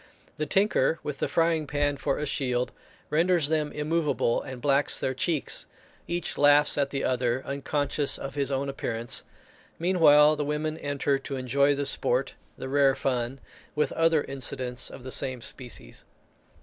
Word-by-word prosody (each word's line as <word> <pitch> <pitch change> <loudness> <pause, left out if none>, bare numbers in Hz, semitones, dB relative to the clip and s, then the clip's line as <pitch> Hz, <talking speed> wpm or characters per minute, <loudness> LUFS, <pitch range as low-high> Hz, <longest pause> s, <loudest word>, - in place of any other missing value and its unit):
The 155 -1 -2
tinker, 165 -4 +2
with 145 -2 -5
the - - 0
frying 165 -2 +1
pan 145 0 0
for 140 0 -1
a 150 - -2
shield, 125 -3 -1 0.4
renders 165 -1 +2
them 155 -2 0
immovable, 150 -6 0
and 130 -1 -8
blacks 140 +2 +2
their 130 - -1
cheeks. 150 +3 0 0.4
Each 175 -1 -3
laughs 145 +1 +5
at 140 -1 +1
the 135 -1 -3
other, 125 0 0
unconscious 140 +1 0
of 135 - -6
his 140 -1 -1
own 135 +1 -1
appearance; 120 -4 -3 0.5
meanwhile 155 -4 +5
the 150 - -2
women 150 +1 -2
enter 140 -1 0
to 135 0 -6
enjoy 140 +2 +2
the 140 0 -2
sport, 130 0 +1 0.2
"the - - -6
rare 135 0 +3
fun," 125 0 -2 0.4
with 150 - +1
other 165 -2 +2
incidents 125 -2 -3
of 125 - -11
the 130 - -7
same 130 -1 -2
species. 125 +1 -7
140 Hz, 160 wpm, -27 LUFS, 130-150 Hz, 0.5 s, laughs